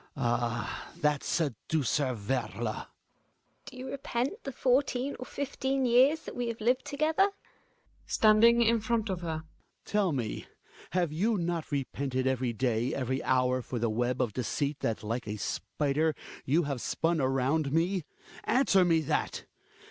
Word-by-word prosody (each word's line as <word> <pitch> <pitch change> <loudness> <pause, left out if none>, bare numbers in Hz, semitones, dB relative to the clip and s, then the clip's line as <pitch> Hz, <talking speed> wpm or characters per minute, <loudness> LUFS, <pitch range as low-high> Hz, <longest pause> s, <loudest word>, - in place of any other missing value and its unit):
Ah! 120 -3 -1
that 150 -3 +1
seducer, 145 -2 0
Werle! 115 0 -2
GiNA. - - -8 0.8
Do 265 -2 -10
you 255 +1 -6
repent 275 - -2
the 275 - -3
fourteen 260 +1 +1
or 255 - -7
fifteen 270 -1 -1
years 260 +6 +5
that - - -8
we 245 -1 -2
have 230 -1 -4
lived 250 +4 +1
together? 310 +7 +2 0.8
Hjalmar - - -3
{landing 225 +2 +7
in 230 0 +3
front 220 -1 0
of 180 -2 -3
her). 160 -2 -3 0.4
Tell 205 -4 +1
me, 120 -7 -3 0.5
have 175 -4 +1
you 210 +7 +1
not 170 -2 -2
repented 135 -2 -2
every 130 -2 +1
day, 120 +1 0
every 130 0 -1
hour, 130 0 +2
for 125 - -5
the 115 -1 0
web 120 +3 0
of 115 -5 -3
deceit 140 +4 -2
that, 110 - -2
like 115 +2 -3
a 105 +1 -3
spider, 150 +7 -1 0.3
you 160 +6 +3
have 140 -4 -3
spun 165 -1 0
around 135 +3 +1
me? 175 +3 +1 0.4
Answer 230 -8 +4
me 165 -2 +3
that 150 - -1
155 Hz, 155 wpm, -30 LUFS, -, 0.8 s, landing